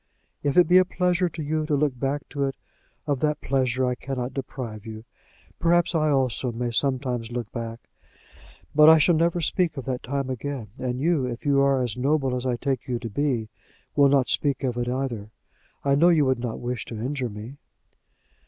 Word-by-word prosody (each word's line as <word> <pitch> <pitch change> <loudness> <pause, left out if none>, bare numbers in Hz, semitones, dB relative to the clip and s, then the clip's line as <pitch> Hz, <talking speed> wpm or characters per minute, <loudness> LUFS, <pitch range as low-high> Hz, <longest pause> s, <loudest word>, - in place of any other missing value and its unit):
If 145 +1 0
it 180 - +7
be 180 +1 +7
a - - +6
pleasure 180 0 0
to 160 -1 -6
you 155 +1 -1
to 150 - +1
look 140 -3 0
back 140 +2 -2
to 140 -1 -1
it, 135 - -3 0.5
of 145 -3 0
that 150 +1 0
pleasure 130 -1 0
I 125 - +1
cannot 130 0 -4
deprive 120 -6 -6
you. 110 0 -9 0.5
Perhaps 175 +1 +3
I 155 -2 +2
also 130 -3 +1
may 120 +1 -3
sometimes 125 -2 0
look 120 -3 -4
back. 115 -1 -6 0.9
But 150 +1 +8
I 160 - +9
shall 165 +3 +4
never 170 +2 +1
speak 165 -1 0
of 135 - -5
that 130 -2 -3
time 140 +1 -3
again; 130 -3 -5
and 125 -1 -2
you, 150 -3 +1
if 120 +4 -6
you 140 -1 +3
are 135 -2 +3
as 120 -3 -3
noble 135 0 +1
as 125 +1 -3
I 125 - +1
take 130 +1 -2
you 125 -2 -1
to 115 -1 -6
be, 120 -3 -1 0.5
will 140 -1 +6
not 135 -2 +3
speak 140 -2 +1
of 125 -3 0
it 120 0 -2
either. 125 -5 -3 0.6
I 140 - +3
know 165 +5 +5
you 160 -4 +4
would 130 -2 +1
not 120 -2 -4
wish 120 -2 -3
to 115 - -7
injure 130 +1 -2
me." 110 +6 -9
135 Hz, 205 wpm, -25 LUFS, 125-150 Hz, 0.9 s, I